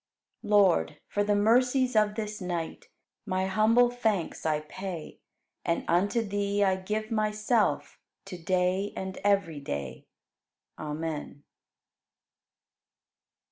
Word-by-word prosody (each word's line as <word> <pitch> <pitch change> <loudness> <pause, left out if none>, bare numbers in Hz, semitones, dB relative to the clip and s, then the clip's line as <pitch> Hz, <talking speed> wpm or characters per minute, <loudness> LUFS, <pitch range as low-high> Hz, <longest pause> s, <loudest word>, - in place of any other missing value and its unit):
16. 210 - -9
Lord, 190 - +4
for 205 - 0
the 205 0 +2
mercies 250 +4 +3
of 210 -1 +3
this 210 -1 -4
night 175 -3 -4 0.4
My 185 -1 0
humble 220 +5 +4
thanks 220 -9 -1
I 155 -1 +1
pay 175 +1 -7 0.4
And 170 -1 -1
unto 200 +7 +2
Thee 205 0 0
I 190 -1 +3
give 215 +4 -3
myself 215 +1 0 0.3
To 180 -3 -8
day 185 +3 0
and 190 0 -5
every 195 -7 +1
day. 70 - -5 0.7
Amen. 150 -1 -5
200 Hz, 110 wpm, -28 LUFS, 175-215 Hz, 0.7 s, Lord